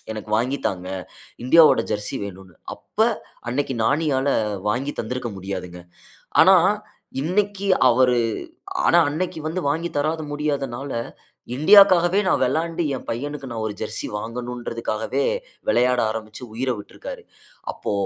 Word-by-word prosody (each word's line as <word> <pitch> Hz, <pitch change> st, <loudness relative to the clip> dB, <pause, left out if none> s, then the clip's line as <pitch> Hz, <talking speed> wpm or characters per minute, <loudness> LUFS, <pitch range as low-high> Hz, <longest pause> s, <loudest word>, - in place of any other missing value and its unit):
எனக்கு 110 Hz, 0 st, -7 dB
வாங்கி 130 Hz, +4 st, -1 dB
தாங்க, 90 Hz, -1 st, -6 dB, 0.6 s
இந்தியாவோட 160 Hz, +4 st, +6 dB
"ஜெர்சி" 105 Hz, 0 st, -3 dB
வேணுன்னு. 95 Hz, -3 st, -10 dB, 0.2 s
அப்ப, -, -, -33 dB, 0.5 s
அன்னைக்கி 135 Hz, 0 st, -1 dB
நானியால 140 Hz, +1 st, +1 dB, 0.4 s
வாங்கி 135 Hz, +6 st, -2 dB
தந்திருக்க 120 Hz, +1 st, -4 dB
முடியாதுங்க. 90 Hz, -2 st, -6 dB, 0.6 s
ஆனா, 190 Hz, 0 st, +7 dB, 0.6 s
இன்னைக்கி 200 Hz, +4 st, 0 dB, 0.2 s
அவரு 125 Hz, 0 st, +4 dB, 0.7 s
ஆனா, 175 Hz, -, +5 dB
அன்னைக்கி 160 Hz, +3 st, -3 dB
வந்து 175 Hz, +4 st, -2 dB
வாங்கி 160 Hz, +4 st, 0 dB
தராத 155 Hz, +2 st, 0 dB
முடியாதனால, 140 Hz, -3 st, -3 dB, 0.7 s
இண்டியாக்காகவே 185 Hz, +2 st, +6 dB
நான் -, -, +2 dB
வெளாண்டு 165 Hz, +1 st, 0 dB
என் -, -, -9 dB
பையனுக்கு, 135 Hz, +3 st, -4 dB
நான் 115 Hz, -2 st, -3 dB
ஒரு 105 Hz, -, -4 dB
"ஜெர்சி" -, -, -3 dB
வாங்கணுன்றதுக்காகவே, 115 Hz, -, -3 dB, 0.4 s
விளையாட 125 Hz, -, +3 dB
ஆரம்பிச்சு 110 Hz, +1 st, -6 dB
உயிர 130 Hz, +2 st, -1 dB
விட்டிருக்கிறாரு. 100 Hz, -, -9 dB, 0.5 s
அப்போ -, -, -4 dB
130 Hz, 115 wpm, -23 LUFS, 115-160 Hz, 0.7 s, ஆனா